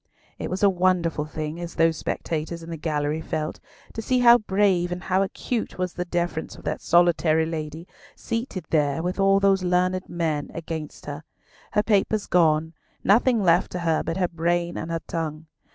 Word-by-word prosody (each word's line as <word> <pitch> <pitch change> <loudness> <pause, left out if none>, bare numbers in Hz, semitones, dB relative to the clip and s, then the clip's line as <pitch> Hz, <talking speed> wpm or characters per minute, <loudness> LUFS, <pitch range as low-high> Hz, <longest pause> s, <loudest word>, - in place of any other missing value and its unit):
It - - -4
was 185 +2 -3
a - - +8
wonderful 175 -4 +1
thing, 155 +1 -5
as 175 -1 -6
those 165 0 +3
spectators 165 +2 -3
in 165 - -8
the - - -3
gallery 150 -1 -1
felt, 155 -1 -3 0.3
to 225 - -4
see 255 +3 +1
how 240 -1 +7
brave 190 -4 +1
and 180 0 -4
how 190 0 +1
acute 220 +4 -3
was 180 -1 -2
the 180 - -3
defence 175 -2 -2
of - - -14
that - - -3
solitary 170 -2 +3
lady, 160 +1 -5 0.3
seated 230 - -4
there 150 0 +1
with 180 +3 -2
all 195 0 +4
those 195 -1 +3
learned 185 +1 0
men 160 -4 -2
against 160 -2 -6
her; 145 +1 -6 0.5
her 210 0 +3
papers 210 0 +1
gone, 160 -2 +2 0.3
nothing 225 +2 +4
left 175 0 +3
to 180 - -2
her 165 -2 +1
but 165 - -3
her 185 -2 +2
brain 170 +1 -1
and 160 - -4
her 165 -1 -2
tongue. 160 -1 -4
175 Hz, 185 wpm, -24 LUFS, 160-185 Hz, 0.5 s, a